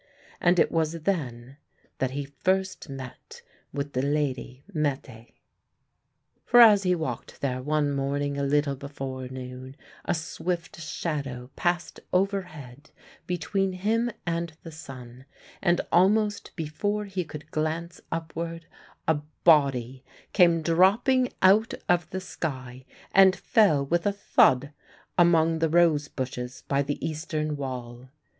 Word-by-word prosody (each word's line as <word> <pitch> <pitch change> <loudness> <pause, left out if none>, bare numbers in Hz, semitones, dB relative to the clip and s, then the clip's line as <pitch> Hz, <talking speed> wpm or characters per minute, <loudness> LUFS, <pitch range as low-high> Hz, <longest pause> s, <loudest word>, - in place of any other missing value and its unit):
And 175 +1 +3
it - - +3
was 165 0 0
then 135 -8 -3 0.4
that 130 - +1
he 140 +2 -4
first 185 +5 -1
met 130 -2 -9 0.3
with 140 0 -4
the 130 - 0
lady 140 -2 -2
Mette. 135 -7 -3 1.1
For 245 - +5
as 215 -4 +9
he 180 -2 +2
walked 135 -8 -5
there 130 -2 -1
one 150 +1 +1
morning, 140 +1 -1
a 140 - -2
little 140 0 +1
before 135 -2 -6
noon, 130 +1 -8 0.3
a - - 0
swift 170 +1 -4
shadow 140 -6 -4
passed 175 0 -1
overhead 160 -8 -2 0.4
between 190 +2 -1
him 220 +6 0 0.2
and 170 -1 -2
the 165 - -8
sun, 130 -4 -11 0.4
and 175 -2 +2
almost 205 +3 +2
before 205 +6 -2
he 190 -2 -3
could 150 0 -10
glance 160 +2 -3
upward 165 0 -4 0.4
a 155 -2 +2 0.2
body 135 -5 +3 0.3
came 170 -4 +4
dropping 210 - +3
out 205 +4 +5
of 175 -2 +2
the 190 - -3
sky 130 -8 -6 0.3
and 190 -1 +6
fell 175 -8 +3
with 170 +6 0
a - - +3
thud 140 -8 +3 0.4
among 165 -2 +4
the 165 0 +2
rose 160 -3 +3
bushes 125 -2 -5
by 140 0 +2
the 140 +1 -3
eastern 155 -1 -3
wall. 125 -2 -6
155 Hz, 130 wpm, -26 LUFS, 135-175 Hz, 1.1 s, as